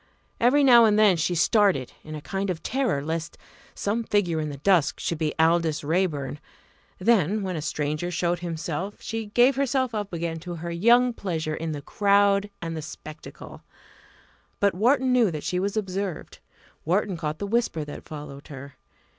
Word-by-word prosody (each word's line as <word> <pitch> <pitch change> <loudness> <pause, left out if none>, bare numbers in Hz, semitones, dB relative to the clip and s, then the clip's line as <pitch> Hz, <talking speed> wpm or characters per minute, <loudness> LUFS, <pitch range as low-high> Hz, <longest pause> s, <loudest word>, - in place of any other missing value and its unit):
Every 265 +5 +4
now 240 -4 +8
and 210 -1 +3
then 210 -4 +5
she 170 +2 0
started 185 - +2
in 155 0 -8
a 150 - -7
kind 195 0 -3
of 175 -3 -4
terror 250 - 0
lest 160 +1 -4 0.4
some 220 +3 -1
figure 185 -7 0
in 155 -1 -2
the 140 - -7
dusk 170 +1 +2
should 170 - -2
be 155 -2 -1
Aldous 160 -1 +2
Raeburn; 150 -4 -1 0.6
then 205 -1 +2
when 185 -2 -3
a 155 - -3
stranger 150 +3 -2
showed 175 0 -1
himself 170 +2 -4
she 225 -1 -5
gave 245 +6 +3
herself 260 -2 0
up 205 -2 -3
again 165 -1 -3
to 175 +1 -7
her 170 +1 -6
young 240 +8 +4
pleasure 160 -7 -3
in 160 +1 -3
the 145 -2 -6
crowd 200 +2 +2
and 165 -1 -4
the 160 - -4
spectacle. 155 +1 -10 1.0
But 200 -1 +3
Wharton 255 +6 +2
knew 240 -5 +4
that 155 -3 -5
she 180 - -1
was 200 +3 -2
observed; 195 -3 -4 0.4
Wharton 190 +3 0
caught 155 -2 -4
the 200 - -4
whisper 200 -8 -1
that 145 - -9
followed 145 -2 -9
her. 140 -1 -10
180 Hz, 175 wpm, -25 LUFS, 155-210 Hz, 1.0 s, now